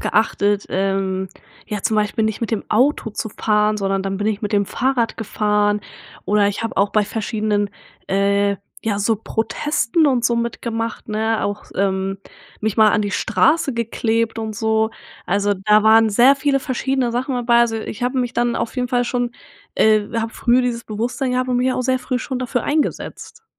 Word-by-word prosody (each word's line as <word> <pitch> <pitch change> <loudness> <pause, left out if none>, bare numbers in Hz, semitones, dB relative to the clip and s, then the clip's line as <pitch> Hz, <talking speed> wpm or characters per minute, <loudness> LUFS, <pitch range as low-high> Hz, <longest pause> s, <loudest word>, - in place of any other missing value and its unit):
geachtet, 205 -2 +1
ähm, 190 0 -1 0.4
ja, 210 -1 -4
zum 220 - +1
Beispiel 215 +1 +1
nicht 220 0 -2
mit 230 - -2
dem 220 -3 -2
Auto 245 0 +2
zu 220 - -4
fahren, 210 0 +1
sondern 195 -1 -1
dann 195 0 -3
bin 205 +1 -2
ich 215 0 -1
mit 210 - -3
dem 200 -1 +2
Fahrrad 250 -3 0
gefahren 210 -1 0 0.4
oder 205 -1 +3
ich 205 +3 -3
hab 225 - -4
auch 200 +1 +3
bei 215 -1 +2
verschiedenen, 210 -2 -1 0.4
äh, 200 +1 +2 0.3
ja, 205 -2 -1
so 220 +2 +2
Protesten 235 +7 0
und 245 -3 +1
so 235 - +3
mitgemacht, 230 -1 -3
ne, 220 +1 0
auch, 205 0 -3
s - - -21
ähm, 195 0 0 0.4
mich 220 -1 -1
mal 220 -1 +6
an 210 - +2
die 205 - -2
Straße 270 - +2
geklebt 230 0 -1
und 220 -2 -5
so. 220 0 +1 0.4
Also, 205 +2 +1
da 210 +3 +3
waren 220 0 +6
sehr 245 +6 +6
viele 275 0 +1
verschiedene 260 -1 -1
Sachen 255 +1 -1
dabei, 235 -1 +3
also 230 -1 +2
ich 220 +1 -6
hab 250 +2 0
mich 245 -2 -1
dann 240 0 0
auf 230 +1 -3
jeden 250 -1 -1
Fall 245 0 +1
schon, 245 0 -1 0.5
äh 215 -1 +3
hab 225 0 -3
früh 245 +2 +3
dieses 240 -2 -2
Bewusstsein 240 +5 -2
gehabt 255 0 0
und 245 - +1
mich 255 +1 +2
auch 255 - -1
sehr 255 0 +1
früh 250 0 -2
schon 255 0 -4
dafür 245 -1 -2
eingesetzt. 310 +8 -3
220 Hz, 190 wpm, -20 LUFS, 205-245 Hz, 0.5 s, mal